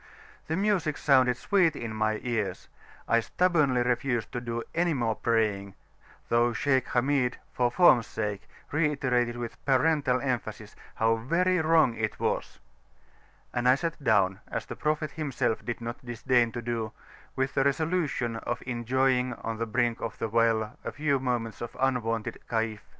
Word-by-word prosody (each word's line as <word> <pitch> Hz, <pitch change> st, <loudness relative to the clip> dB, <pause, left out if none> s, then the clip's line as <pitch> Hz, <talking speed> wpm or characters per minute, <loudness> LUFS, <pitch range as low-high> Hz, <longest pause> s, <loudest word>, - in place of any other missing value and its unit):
The 160 Hz, -, -1 dB
music 190 Hz, -6 st, +1 dB
sounded 130 Hz, -3 st, +4 dB
sweet 180 Hz, -3 st, +2 dB
in 115 Hz, -4 st, -5 dB
my 110 Hz, 0 st, 0 dB
ears; 115 Hz, -5 st, -2 dB, 0.4 s
I 115 Hz, -, +4 dB
stubbornly 145 Hz, -3 st, +2 dB
refused 120 Hz, -2 st, -1 dB
to 120 Hz, -, -4 dB
do 115 Hz, -1 st, -3 dB
any 170 Hz, -1 st, +1 dB
more 115 Hz, -4 st, 0 dB
praying 105 Hz, -4 st, 0 dB, 0.5 s
though 120 Hz, 0 st, +2 dB
Shaykh 130 Hz, +3 st, +1 dB
Hamid, 125 Hz, 0 st, +1 dB, 0.2 s
for 125 Hz, -1 st, +2 dB
form's 130 Hz, -5 st, +5 dB
sake, 105 Hz, -2 st, -4 dB, 0.2 s
reiterated 130 Hz, -6 st, +1 dB
with 120 Hz, -1 st, -7 dB
parental 135 Hz, -1 st, +2 dB
emphasis, 130 Hz, -3 st, -4 dB, 0.2 s
"how 115 Hz, 0 st, +2 dB
very 180 Hz, +10 st, +1 dB
wrong 160 Hz, -5 st, +4 dB
it 110 Hz, -1 st, -3 dB
was," -, -, -2 dB, 1.0 s
and 125 Hz, 0 st, +2 dB
I 130 Hz, -, +7 dB
sat 165 Hz, 0 st, -4 dB
down, 95 Hz, -5 st, +3 dB
as -, -, -4 dB
the -, -, -7 dB
Prophet 150 Hz, -1 st, -1 dB
himself 140 Hz, -7 st, -2 dB
did 120 Hz, -1 st, -4 dB
not 120 Hz, +3 st, -6 dB
disdain 120 Hz, 0 st, +1 dB
to 120 Hz, -, -5 dB
do, 115 Hz, -2 st, -3 dB, 0.4 s
with 130 Hz, +1 st, -1 dB
the 135 Hz, -, +2 dB
resolution 140 Hz, -5 st, 0 dB
of 120 Hz, +2 st, -4 dB
enjoying 125 Hz, +1 st, +1 dB
on 115 Hz, -1 st, -5 dB
the 115 Hz, -, -1 dB
brink 120 Hz, +1 st, 0 dB
of 115 Hz, -, -4 dB
the 115 Hz, -, -3 dB
well 115 Hz, -1 st, +1 dB
a -, -, -4 dB
few 145 Hz, -2 st, 0 dB
moments 120 Hz, -4 st, -2 dB
of 120 Hz, -, -6 dB
unwonted 115 Hz, -4 st, -1 dB
"Kayf." 110 Hz, -2 st, -1 dB
125 Hz, 155 wpm, -28 LUFS, 115-140 Hz, 1.0 s, I